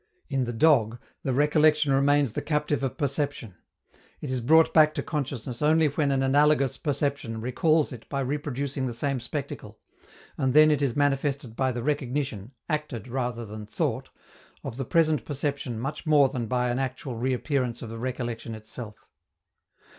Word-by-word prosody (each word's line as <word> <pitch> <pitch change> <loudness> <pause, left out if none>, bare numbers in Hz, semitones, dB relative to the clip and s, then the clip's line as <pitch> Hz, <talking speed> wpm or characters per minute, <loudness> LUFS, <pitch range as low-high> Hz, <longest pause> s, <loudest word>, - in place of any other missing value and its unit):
In 135 -3 0
the 120 - -3
dog, 120 -3 +3 0.2
the 135 - -1
recollection 150 +1 +3
remains 140 -2 +3
the - - -2
captive 150 -1 -1
of 135 -2 -3
perception; 140 - -2 0.7
it 140 - -5
is 130 -1 -1
brought 160 +7 +5
back 155 -1 +5
to - - -2
consciousness 135 -5 -4
only 155 +1 +4
when 145 0 0
an 135 -1 +1
analogous 145 0 +3
perception 140 -6 -2
recalls 150 +6 +1
it 120 -4 -10
by 140 -1 -2
reproducing 140 -1 -2
the 120 - -5
same 135 +2 -1
spectacle, - - -6 0.6
and 130 0 +1
then 155 0 +7
it 145 -1 +1
is 135 -5 0
manifested 140 -3 0
by 130 +1 +1
the 120 -1 -4
recognition, 135 -6 -2 0.2
acted 150 - -3
rather 120 -2 -3
than 105 0 -8
thought, - - -2 0.5
of 115 - -6
the 135 - -3
present 155 -5 +2
perception 140 -4 -3
much 140 +6 -5
more 145 -3 +5
than 125 -4 -3
by 125 +1 0
an 120 - -1
actual 130 -1 -4
reappearance 125 0 -1
of 115 - -7
the 115 - -7
recollection 120 -2 -4
itself. 110 0 -10
135 Hz, 165 wpm, -26 LUFS, 120-145 Hz, 0.7 s, then